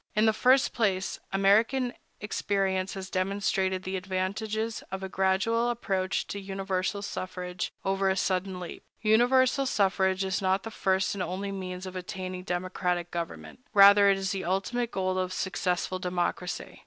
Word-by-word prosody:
In 215 +1 +4
the 220 - +4
first 260 +5 +4
place, 195 -5 0
American 225 +6 +3 0.3
experience 195 -2 -1
has 190 -1 -7
demonstrated 190 0 0
the 190 0 -3
advantages 205 +4 -2
of 190 0 -5
a 190 - -4
gradual 195 +6 +1
approach 195 -6 -1
to 200 - -4
universal 195 0 -2
suffrage, 185 -3 -4
over 195 0 +1
a 190 - +1
sudden 185 0 -1
leap. 175 -2 -7 0.2
Universal 255 +5 +4
suffrage 190 -3 +2
is 190 0 -1
not 190 0 +1
the 225 - -6
first 190 -2 +1
and 200 - -4
only 195 +2 -3
means 185 -1 -5
of 185 0 -7
attaining 185 0 -5
democratic 180 -1 -2
government; 170 +7 -6 0.2
rather, 200 0 +8
it 195 - +4
is 190 -1 -2
the 195 -1 -3
ultimate 210 +7 -1
goal 185 -3 -1
of 185 0 -1
successful 185 0 -1
democracy. 180 0 -3
190 Hz, 155 wpm, -28 LUFS, 185-205 Hz, 0.3 s, rather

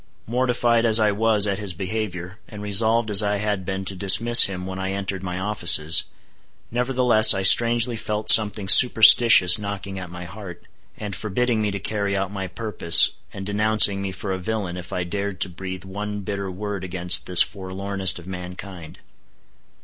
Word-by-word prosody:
Mortified 120 -1 -2
as 115 -1 +1
I 105 -1 0
was 105 0 0
at 100 -1 -4
his 100 -3 -5
behavior, 95 -1 -8
and 105 -1 -12
resolved 110 +2 0
as 100 0 +6
I 105 0 -3
had 105 -2 -4
been 95 0 -6
to 95 - -5
dismiss 115 +5 +5
him 90 -2 -8
when 95 0 -9
I 95 0 -5
entered 95 -1 -7
my 90 -1 -7
offices, 85 -6 +2 0.7
nevertheless 125 -3 +3
I 95 - -4
strangely 120 +4 +3
felt 105 -1 -7
something 105 -2 +3
superstitious 110 -4 +6
knocking 100 -1 -8
at 90 -2 -10
my 90 0 -11
heart, 90 -1 -13 0.3
and 105 -2 -8
forbidding 110 +3 -4
me 105 - -3
to 100 - -6
carry 100 0 -4
out 95 0 -5
my 95 -2 -7
purpose, 90 -4 +2 0.2
and 95 - -10
denouncing 105 -1 +2
me 100 -1 -6
for 95 +1 -8
a 95 - -5
villain 95 -2 -6
if 90 -1 -11
I 90 - -5
dared 100 +2 -7
to 95 - +1
breathe 95 0 -10
one 105 +2 -8
bitter 100 0 -7
word 100 0 -8
against 90 -1 -1
this 90 -1 +4
forlornest 95 +1 -4
of 85 - -14
mankind. 90 -2 -11
100 Hz, 175 wpm, -20 LUFS, 95-110 Hz, 0.7 s, as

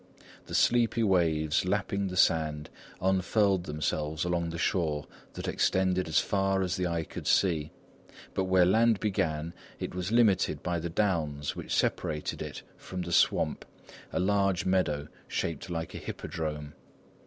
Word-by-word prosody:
The - - -4
sleepy 115 -1 +3
waves 80 -6 +2
lapping 100 +1 -1
the 90 0 -5
sand 75 -4 +2 0.3
unfurled 95 0 +2
themselves 75 +1 -2
along 85 -1 0
the 85 - -5
shore 80 -4 0 0.3
that - - -6
extended 95 -1 +1
as 80 - 0
far 95 -1 +2
as 90 -1 -1
the 90 -2 -1
eye 85 -1 -1
could - - -8
see, 80 -6 +2 0.6
but 95 - 0
where 95 -1 +4
land 110 +3 +4
began, 80 -6 -1 0.3
it - - -4
was 90 +2 -3
limited 115 -6 +3
by 85 -1 -1
the 85 +1 -4
downs 80 -7 -1
which - - -7
separated 75 -1 -1
it - - -6
from 90 -1 -6
the 85 - -6
"Swamp," - - +2 0.5
a - - -1
large 100 -1 +2
meadow 75 -6 +1 0.2
shaped 85 +2 -3
like 80 -1 -4
a - - -6
hippodrome. 75 -2 -5
90 Hz, 150 wpm, -29 LUFS, 80-95 Hz, 0.6 s, where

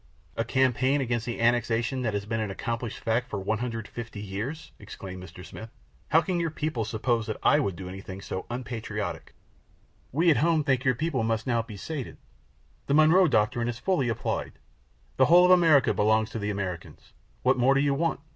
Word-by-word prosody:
"A - - 0
campaign 130 +2 +2
against 120 -3 -2
the 120 - -4
annexation 120 +2 +1
that 110 -4 -1
has 100 0 -3
been 115 +1 -2
an 110 -2 -2
accomplished 115 +3 -4
fact 120 +2 -1
for - - -3
150 115 +2 -4
years!" 110 +11 -5
exclaimed 95 -3 -9
Mr. 90 +1 -11
Smith. 110 +3 -9 0.4
"How 160 +2 +4
can 175 +1 -1
your 165 -1 0
people 150 -7 -2
suppose 115 +1 -1
that - - -3
I - - +5
would 100 -3 -1
do 90 +2 -8
anything 95 0 -8
so 95 -1 -6
unpatriotic?" 120 -2 -5 0.8
"We 165 +5 +3
at 150 - +3
home 160 0 +2
think 135 -3 +2
that - - -11
your 130 -1 +3
people 150 -1 -1
must 115 0 -1
now 120 -2 +1
be 110 -2 -10
sated. 140 +5 -6 0.7
The 140 - +2
Monroe 160 +4 +6
doctrine 115 -2 +1
is 120 -1 -3
fully 135 -2 0
applied; 115 - -3 0.6
the - - +6
whole 175 +3 +7
of 180 - +5
America 165 -7 +5
belongs 110 +1 +2
to 115 - -4
the 105 0 -2
Americans. 95 -4 -6 0.3
What - - +3
more 130 +3 +4
do - - +3
you 140 0 +2
want? 160 0 -1
120 Hz, 195 wpm, -27 LUFS, 110-140 Hz, 0.8 s, whole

